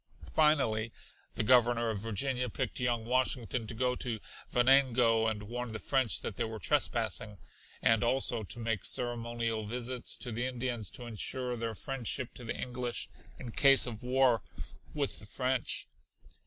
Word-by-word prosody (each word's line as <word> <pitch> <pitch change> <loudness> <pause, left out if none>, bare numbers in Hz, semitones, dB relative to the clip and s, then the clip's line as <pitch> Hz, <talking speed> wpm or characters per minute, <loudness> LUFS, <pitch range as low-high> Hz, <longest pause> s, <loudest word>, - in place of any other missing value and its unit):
Finally 120 -8 +3 0.4
the - - +1
Governor 120 -1 +4
of 105 - -3
Virginia 125 +4 -1
picked - - -3
young 120 -2 0
Washington 125 -2 0
to 115 - -5
go 125 +2 +1
to 120 -3 -3 0.3
Venango 120 -3 +4
and 105 -2 -2
warn 120 +2 -5
the - - -3
French 130 -4 +2
that 100 - -5
they - - 0
were 110 -1 -4
trespassing, 105 +1 0 0.5
and 115 0 +4
also 120 -1 +2
to 110 - -7
make 115 -4 -2
ceremonial 120 -2 -1
visits 125 +2 -3
to 125 - -4
the 120 +3 -1
Indians 120 -5 -2
to 125 - -7
ensure 125 +2 -1
their 115 -1 -3
friendship 130 -1 -2
to 125 - -10
the 115 - -4
English 125 -1 -3 0.3
in 125 -3 -7
case 135 +3 +6
of 115 -3 -6
war 125 -3 +3 0.5
with 145 -2 -2
the 105 - -12
French. 130 +2 0
120 Hz, 155 wpm, -32 LUFS, 115-125 Hz, 0.5 s, case